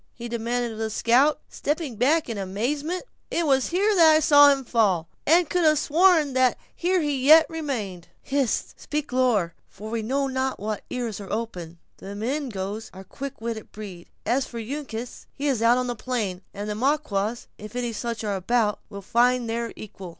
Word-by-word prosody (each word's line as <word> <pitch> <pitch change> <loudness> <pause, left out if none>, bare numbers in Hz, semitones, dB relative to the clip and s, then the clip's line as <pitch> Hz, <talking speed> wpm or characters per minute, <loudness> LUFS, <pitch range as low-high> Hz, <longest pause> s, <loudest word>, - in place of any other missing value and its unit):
he 240 0 -7
demanded 235 +1 -2
of 220 - -8
the 220 0 -1
scout, 255 +7 +3
stepping 295 -4 -3
back 290 +8 +2
in 230 - -4
amazement; 255 - -2 0.3
"it 340 - 0
was 270 -3 +3
here 400 +5 +2
that 325 -5 +6
I - - +5
saw 290 -1 +7
him 275 -1 0
fall, 195 -9 +2 0.2
and 335 +2 +5
could 355 +3 0
have 310 -1 +5
sworn 320 -1 +3
that 255 -1 +3 0.2
here 360 +1 +1
he 285 -4 -1
yet 315 +2 +8
remained." 235 - -4 0.2
"Hist! 275 -3 -1
speak 300 -3 -4
lower; 230 -10 +2 0.2
for 215 +3 -9
we 230 -1 -1
know 270 +5 0
not 265 0 -2
what 210 +1 -3
ears 235 -5 -4
are 195 - -9
open, 180 -7 -4 0.2
and 195 - -9
the 200 - -6
Mingoes 220 -4 -3
are 190 - -9
a - - -14
quick 275 +5 -8
witted 225 -2 -5
breed. 195 -5 -9 0.2
As 265 +2 +1
for 235 - -7
Uncas, 245 -1 -6
he 285 - -4
is 260 -6 +1
out 235 +2 +5
on 255 - 0
the 245 -1 -3
plain, 215 -7 -3
and 205 +1 -6
the 210 - -2
Maquas, 235 -3 -1
if 210 +2 -10
any 240 -2 -2
such 230 0 -4
are 205 -2 -1
about 210 +3 +1
us, - - -18
will 200 - -8
find 245 +3 +2
their 230 0 -2
equal." 195 -3 -9
240 Hz, 200 wpm, -25 LUFS, 215-285 Hz, 0.3 s, yet